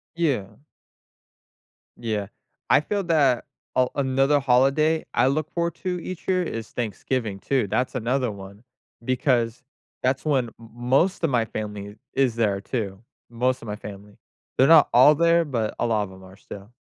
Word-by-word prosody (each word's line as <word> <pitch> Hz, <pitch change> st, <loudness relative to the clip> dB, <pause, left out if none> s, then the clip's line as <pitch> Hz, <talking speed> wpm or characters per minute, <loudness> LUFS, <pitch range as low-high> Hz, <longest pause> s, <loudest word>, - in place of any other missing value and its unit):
Yeah. 140 Hz, -, -1 dB, 1.4 s
Yeah. 105 Hz, -4 st, -3 dB, 0.4 s
I 145 Hz, -, +5 dB
feel 200 Hz, +4 st, -2 dB
that, 140 Hz, -8 st, +2 dB, 0.3 s
uh, 130 Hz, -1 st, +3 dB
another 135 Hz, +1 st, +2 dB
holiday 140 Hz, +5 st, +2 dB
I 120 Hz, -, +3 dB
look 155 Hz, +2 st, -1 dB
forward 170 Hz, -1 st, -1 dB
to 180 Hz, -1 st, -3 dB
each 185 Hz, -2 st, -7 dB
year 185 Hz, -1 st, +2 dB
is 115 Hz, -8 st, -5 dB
Thanksgiving, 115 Hz, -2 st, -3 dB
too. 130 Hz, -3 st, 0 dB
That’s 125 Hz, +7 st, -1 dB
another 125 Hz, 0 st, 0 dB
one 100 Hz, +2 st, -11 dB, 0.4 s
because 125 Hz, -2 st, +1 dB, 0.4 s
that’s 130 Hz, +3 st, 0 dB
when 135 Hz, -5 st, +2 dB
m 115 Hz, -, -14 dB
most 135 Hz, +11 st, +1 dB
of 165 Hz, -, +3 dB
my 120 Hz, -4 st, +1 dB
family 105 Hz, -2 st, -6 dB, 0.2 s
is 130 Hz, -4 st, +1 dB
there 105 Hz, -4 st, +1 dB
too. 100 Hz, -4 st, -4 dB, 0.3 s
Most 125 Hz, +2 st, 0 dB
of 115 Hz, -, -10 dB
my 105 Hz, -, -3 dB
family. 100 Hz, 0 st, -11 dB, 0.4 s
They’re 135 Hz, -, +5 dB
not 155 Hz, -, +6 dB
all 140 Hz, +5 st, +7 dB
there, 170 Hz, +1 st, +3 dB
but 115 Hz, -7 st, -2 dB
a -, -, +1 dB
lot 110 Hz, -3 st, +1 dB
of 100 Hz, -, -7 dB
them 95 Hz, 0 st, -14 dB
are 95 Hz, 0 st, -14 dB
still. 100 Hz, +2 st, -11 dB
125 Hz, 165 wpm, -24 LUFS, 110-145 Hz, 1.4 s, all